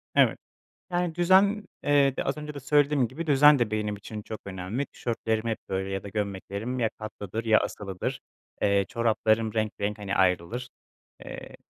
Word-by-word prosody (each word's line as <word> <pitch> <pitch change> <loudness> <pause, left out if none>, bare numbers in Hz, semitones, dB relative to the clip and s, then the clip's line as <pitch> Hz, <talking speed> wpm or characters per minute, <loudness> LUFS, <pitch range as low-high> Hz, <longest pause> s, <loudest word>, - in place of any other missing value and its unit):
Evet. - - +5 0.5
Yani 175 -2 0
düzen, 190 +4 +4 0.2
eee, 140 -2 +4
de - - -1
az 135 - -1
önce 150 0 -6
de 140 - -6
söylediğim 145 -2 +3
gibi 165 +6 -6
düzen 145 0 +7
de 115 -3 +1
benim 105 -1 -1
için 105 +1 -8
çok 110 - -7
önemli. 100 +8 -3
Tişörtlerim 115 -1 -2
hep 110 - -1
böyle 95 0 -2
ya 95 -1 -3
da 100 - -7
gömleklerim 100 +4 -3
ya 115 -3 +1
katlıdır, 110 0 -5
ya 110 -1 +5
asılıdır. 95 -3 -4 0.4
Eee, 100 -1 +3
çoraplarım 110 -1 +1
renk 110 -1 0
renk 105 +1 -1
hani 100 -1 -3
ayrılır, 95 +7 +1 0.6
eee, - - -9
110 Hz, 170 wpm, -27 LUFS, 100-140 Hz, 0.6 s, düzen